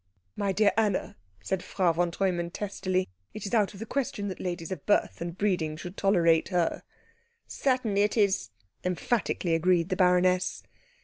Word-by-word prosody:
"My 200 -1 0
dear 200 +2 +3
Anna," 210 -4 0 0.3
said 190 - -1
Frau 180 -4 +1
von 175 +1 +1
Treumann 175 -1 -1
testily, 185 -1 -2 0.3
"it 215 - -6
is 200 - -5
out 210 -3 +2
of - - -11
the 225 - -5
question 230 -6 -2
that 185 - -6
ladies 175 -2 -4
of 185 - -5
birth 205 - +2
and 170 +1 -5
breeding 175 -7 0
should 180 +3 -8
tolerate 170 -5 +3
her." 175 -3 0 0.6
"Certainly 250 -7 0
it 210 +3 +1
is," 200 -3 +2 0.3
emphatically 180 -1 0
agreed 170 +1 +2
the 185 - 0
baroness. 180 0 +2
185 Hz, 165 wpm, -28 LUFS, 175-205 Hz, 0.6 s, dear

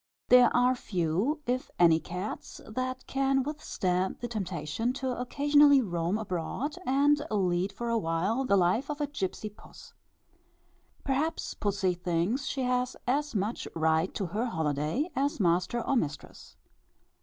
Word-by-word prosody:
There 250 -1 +8
are 250 +1 +4
few, 195 - -1
if 250 +1 -1
any 165 -2 +5
cats, 180 +5 -6
that 255 +3 -4
can 270 0 +1
withstand 190 -11 -2
the 240 - -4
temptation 195 +1 -2
to 260 -1 -2
occasionally 285 +3 +4
roam 175 -4 -1
abroad, 220 - -3
and 285 +3 +3
lead 185 -2 0
for 235 +4 -5
a 230 -1 +1
while 185 +9 0
the 200 -6 +3
life 185 +10 +2
of 295 0 -3
a 295 - +1
gipsy 215 -6 -4
puss. 210 - -15 1.1
Perhaps 295 +4 -1
pussy 200 -3 0
thinks 180 +9 -1
she 265 - -2
has 250 0 0
as 285 +2 0
much 205 +4 -2
right 160 +2 +2
to 195 - -1
her 210 +7 -2
holiday, 160 - -1
as 280 +1 0
master 180 +5 +1
or 275 - +1
mistress. 150 - -4
225 Hz, 145 wpm, -29 LUFS, 180-265 Hz, 1.1 s, There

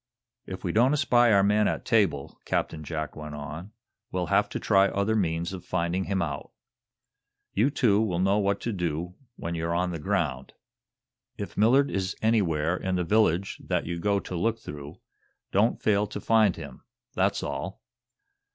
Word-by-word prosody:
"If - - -7
we - - -1
don't 125 +6 +4
espy 120 -5 +4
our 100 -2 +5
man 105 +1 +3
at - - -2
table," 100 -12 +1
Captain 80 -1 -2
Jack 75 0 -4
went 75 -1 -7
on, 80 +7 -7 0.4
"we'll 90 -1 -1
have - - +3
to - - -4
try 95 0 +4
other 100 +3 0
means 85 -3 -1
of 95 - -7
finding 90 +1 -1
him 95 -3 0
out. 70 -4 -5 1.0
You 115 +8 +3
two 115 -8 +3
will 95 -6 0
know 95 +3 +2
what 100 -1 +1
to 115 - -2
do 90 -1 -3 0.2
when 85 - -5
you're 85 0 -2
on 90 +1 0
the 85 - -4
ground. 65 -3 -2 0.8
If - - -6
Millard 130 +7 +4
is 95 -1 -2
anywhere 85 -8 +1
in 95 0 -2
the 90 - 0
village 95 -1 +1
that - - -1
you 85 0 -4
go 100 +2 +1
to 95 - -7
look 115 +6 0
through, 75 -6 -9 0.6
don't 105 +5 +2
fail 105 0 +2
to - - -6
find 110 -5 +3
him - - -10 0.3
that's - - +1
all." - - -5
95 Hz, 175 wpm, -27 LUFS, 85-105 Hz, 1.0 s, our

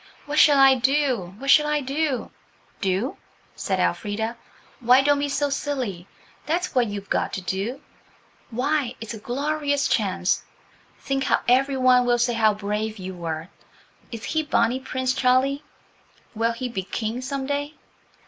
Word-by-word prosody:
What 295 +1 0
shall 290 -2 +7
I 270 -1 +7
do? 260 -8 0
What 275 +4 +1
shall 300 +1 +6
I 300 0 +1
do?" 280 -1 -2 0.5
"Do?" 195 +7 -1 0.4
said - - -2
Elfrida. 220 +2 -1 0.4
"Why 250 +2 +5
don't 290 0 +3
be 285 0 -1
so 285 0 0
silly. 250 -11 -3 0.4
That's 350 +4 -1
what 250 -3 +2
you've 200 -1 -6
got - - 0
to 190 - -3
do. 200 +9 -3 0.7
Why, 260 +2 -1
it's 225 0 -6
a 220 - -8
glorious 285 +4 -1
chance. 190 -4 +1 0.6
Think 270 -1 -2
how - - +2
every 265 +2 +3
one 250 -1 +4
will 240 0 +3
say 240 0 +1
how 220 -2 +3
brave 210 +2 -3
you 190 -1 -6
were. 165 -1 -5 0.6
Is 230 -1 -7
he 315 - 0
Bonnie 260 -4 +1
Prince 260 -1 -2
Charlie? 260 +2 +2 0.7
Will 230 +1 0
he 250 +2 -4
be 230 -6 -3
King 220 +5 -4
some 270 +1 -3
day?" 285 +2 -3
255 Hz, 160 wpm, -24 LUFS, 220-280 Hz, 0.7 s, shall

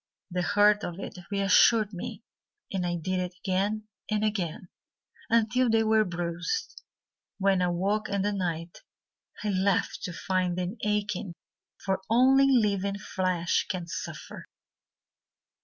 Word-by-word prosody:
The 180 0 -1
hurt 210 +3 +4
of 175 +1 -5
it 190 - -7
reassured 200 +2 +4
me, 180 - -6 0.5
And 185 -2 -1
I 175 - -1
did 185 +2 -2
it 180 0 -3
again 205 +3 -1 0.2
and 215 0 +1
again 185 -4 -2 0.6
Until 230 +2 +3
they 225 0 +3
were 220 0 +4
bruised. 175 - -3 0.6
When 195 -1 +2
I 180 - +2
woke 200 +5 0
in 200 -1 0
the 205 - +1
night 170 -3 -3 0.6
I 210 - 0
laughed 190 0 +1
to 180 - -4
find 185 0 -1
them 185 +5 -3
aching, 210 -3 -1 0.4
For 190 -1 -2
only 265 +4 +5
living 200 -6 +2
flesh 185 -4 0
can 180 -3 -3
suffer. 170 - -7
195 Hz, 135 wpm, -28 LUFS, 180-215 Hz, 0.6 s, only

